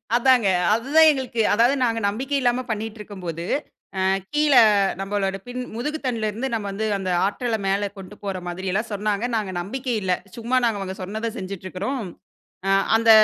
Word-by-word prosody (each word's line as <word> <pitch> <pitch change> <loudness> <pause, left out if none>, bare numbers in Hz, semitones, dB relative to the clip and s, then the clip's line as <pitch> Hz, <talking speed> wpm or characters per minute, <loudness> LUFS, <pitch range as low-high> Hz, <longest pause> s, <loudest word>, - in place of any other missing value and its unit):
அதாங்க. 245 -3 +4 0.3
அதுதான் 290 +8 +5
எங்களுக்கு 260 -5 0
அதாது 235 +5 +4
நாங்க 230 -1 +1
நம்பிக்கை 265 +7 -2
இல்லாம 245 0 +1
பண்ணிகிட்டுருக்கும்போது, 210 -6 -5 0.6
அ - - +2 0.3
கீழ 300 -1 +3 0.5
நம்பளோட 195 0 -1
பின் 250 +1 -4
முதுகு 300 +6 -2
தண்டுலேருந்து 230 +1 -1
நம்ப 215 -2 -2
வந்து 220 +3 -2
அந்த 185 -1 -3 0.2
ஆற்றல்ல 230 +2 -1
மேல 200 +1 +1
கொண்டு 195 +2 -10
போற 195 -2 -3
மாதிரியெல்லாம் 190 +5 -2
சொன்னாங்க. 205 +2 -1
நாங்க 200 -4 -2
நம்பிக்கை 250 +6 -3
இல்ல. 185 -1 +2 0.2
சும்மா 235 +2 -1
நாங்க 225 -3 +1
அவங்க 190 -1 -4
சொன்னத 220 +4 -3
செஞ்சுட்ருக்குறோம். 190 +6 -4 0.7
"அ - - +3 0.3
அந்த 225 0 +4
220 Hz, 150 wpm, -23 LUFS, 195-245 Hz, 0.7 s, அதுதான்